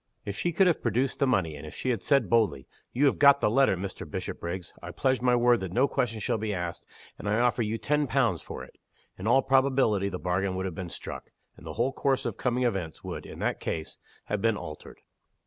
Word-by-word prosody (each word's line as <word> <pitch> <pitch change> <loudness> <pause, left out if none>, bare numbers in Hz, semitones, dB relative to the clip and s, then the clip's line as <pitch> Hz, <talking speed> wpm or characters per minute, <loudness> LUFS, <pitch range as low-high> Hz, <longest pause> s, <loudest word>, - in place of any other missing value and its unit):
If 100 - -4
she 175 - -1
could 190 +4 +4
have 175 -3 +2
produced 125 +3 0
the 140 - +3
money; 90 -11 +1
and 70 - -9
if 75 - -9
she 130 - -1
had 115 -5 -2
said, 140 -3 +2
boldly, 110 - +2 0.3
"You 135 +4 +2
have 140 - +2
got 140 -1 +7
the 105 - +2
letter, 130 -5 +4
Mr. 95 +1 -6
Bishopriggs: 85 +1 -5
I - - -7
pledge 130 -1 0
my 125 -1 +4
word 120 0 +4
that 95 -2 -5
no 130 +6 +4
questions 115 -6 -1
shall 110 - 0
be 105 -1 -2
asked, 90 -1 -5 0.3
and 105 - -3
I 105 +2 +2
offer 120 -1 +2
you 110 0 -1
ten 150 +6 0
pounds 115 - +1
for - - -7
it" - - -15 0.4
in 95 - -4
all 135 +3 +5
probability 130 -7 +3
the 90 - -4
bargain 95 +1 -1
would 95 0 -2
have 95 - -3
been 90 +1 -6
struck; - - -8 0.3
and - - -13
the - - -5
whole 125 +4 0
course 135 0 0
of 115 -4 -2
coming 125 0 0
events 95 -9 -2
would, - - -6
in - - -9
that - - 0
case, 80 -1 -4 0.3
have 105 -1 -2
been 115 -1 +2
altered. 75 -4 -9
115 Hz, 235 wpm, -28 LUFS, 95-130 Hz, 0.4 s, got